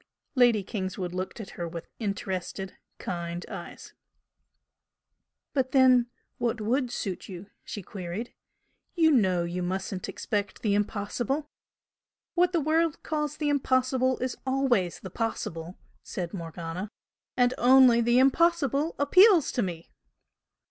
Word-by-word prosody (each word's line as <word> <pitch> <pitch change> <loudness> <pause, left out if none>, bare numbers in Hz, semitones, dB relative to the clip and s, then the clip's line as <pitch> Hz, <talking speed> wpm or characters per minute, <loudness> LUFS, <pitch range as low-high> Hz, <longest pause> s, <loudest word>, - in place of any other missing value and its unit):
Lady 245 -6 +4
Kingswood 185 -3 -4
looked 185 +4 -4
at 215 - -7
her 170 - -5
with 170 0 -7
interested, 190 -3 -4 0.2
kind 170 0 -4
eyes. - - -9 1.6
"But 260 -2 0
then, 255 -3 +6 0.3
what 235 -1 0
WOULD 245 +4 0
suit 195 -4 -4
you?" 190 +2 -9
she 205 - -7
queried 185 +5 -6 0.6
"You 325 -2 +5
know 190 - +3
you 175 +1 -3
mustn't 185 +1 -3
expect 205 -1 -3
the 210 -3 +2
impossible!" 225 +8 -2 0.8
"What 360 0 +3
the 345 - +2
world 320 +1 +1
calls 300 -1 -2
the 300 -1 0
impossible 260 -2 +2
is 255 - -2
always 260 -9 +1
the 190 - -9
possible" 175 -6 -4 0.2
said 175 -1 -5
Morgana 170 +2 -5 0.5
"And 245 0 +4
only 250 -1 +7
the 240 +1 +3
impossible 290 +2 +3
appeals 360 - +6
to 245 - 0
me!" 170 -5 -5
230 Hz, 125 wpm, -27 LUFS, 185-265 Hz, 1.6 s, only